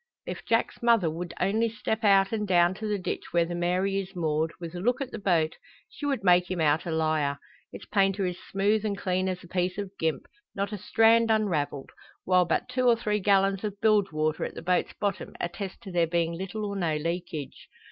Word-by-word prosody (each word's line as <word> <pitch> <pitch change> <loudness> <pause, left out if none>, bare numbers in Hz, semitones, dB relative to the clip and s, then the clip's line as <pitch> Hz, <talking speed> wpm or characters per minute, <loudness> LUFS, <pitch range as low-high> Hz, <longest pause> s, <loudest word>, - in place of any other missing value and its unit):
If - - -6
Jack's - - 0
mother 230 -9 +3
would 170 +2 -5
only 220 +5 +1
step 220 0 -3
out, 195 -2 +5
and 210 -2 -2
down 175 -1 +4
to 215 +3 -5
the 210 -1 0
ditch 185 - -4
where 170 -1 +3
the 175 - -5
Mary 180 +3 0
is 195 0 -7
moored, 160 -1 0
with 170 -1 -7
a 175 - -5
look 240 +7 +1
at 270 -2 -4
the 225 - -6
boat, 170 -5 +1 0.3
she 290 - -5
would 270 -7 -1
make 180 -1 +4
him 185 -2 -2
out 155 +1 +2
a - - -2
liar. 155 -3 0 0.3
Its - - -10
painter 195 -1 +1
is 180 0 -3
smooth 205 +2 +1
and 205 -2 -2
clean 185 -1 0
as 185 0 -4
a - - -12
piece 180 +1 -1
of 200 -2 -4
gimp, 160 -1 -1 0.3
not 200 +1 -2
a 210 - -3
strand 225 +3 +4
unravelled 170 -11 0 0.3
while 180 -1 +4
but 165 - 0
two 250 0 0
or 240 - +6
three 210 -2 -1
gallons 195 0 +2
of 205 -1 -4
bilge 210 -3 +3
water 155 0 -1
at - - -5
the - - -7
boat's 180 +1 +1
bottom 200 -2 -3
attest 190 +2 -5
to 190 - -8
there 170 -2 +2
being 170 0 0
little 190 +5 -4
or 200 -1 -4
no 170 -5 0
leakage. 165 -2 -4
185 Hz, 220 wpm, -27 LUFS, 170-210 Hz, 0.3 s, or